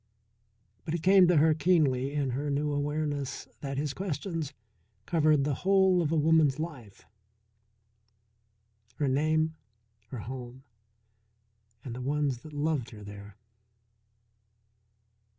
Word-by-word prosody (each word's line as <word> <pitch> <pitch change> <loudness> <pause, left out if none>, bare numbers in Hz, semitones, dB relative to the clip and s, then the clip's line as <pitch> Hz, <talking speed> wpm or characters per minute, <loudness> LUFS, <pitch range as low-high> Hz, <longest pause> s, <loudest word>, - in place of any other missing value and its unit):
But 165 -1 -3
it 165 - -4
came 190 -1 +6
to 175 -2 +4
her 155 +2 +5
keenly 145 -5 +2
in 145 -3 -1
her 145 +4 -2
new 145 +1 0
awareness 145 -1 -2
that 135 -1 -5
his 145 0 -2
questions 165 -4 -4 0.5
covered 155 -3 +3
the 145 0 0
whole 190 -1 +4
of 160 -2 -1
a - - +2
woman's 155 -3 +3
life: 140 - -7 1.9
Her 145 +2 -1
name, 155 +4 +1 0.5
her 125 -3 -7
home, 125 +2 -8 1.2
and 125 - -5
the 125 - -6
ones 140 -1 -1
that 155 +4 -12
loved 145 -4 -1
her 105 -4 -11
there. 100 0 -11
145 Hz, 120 wpm, -29 LUFS, 130-160 Hz, 1.9 s, came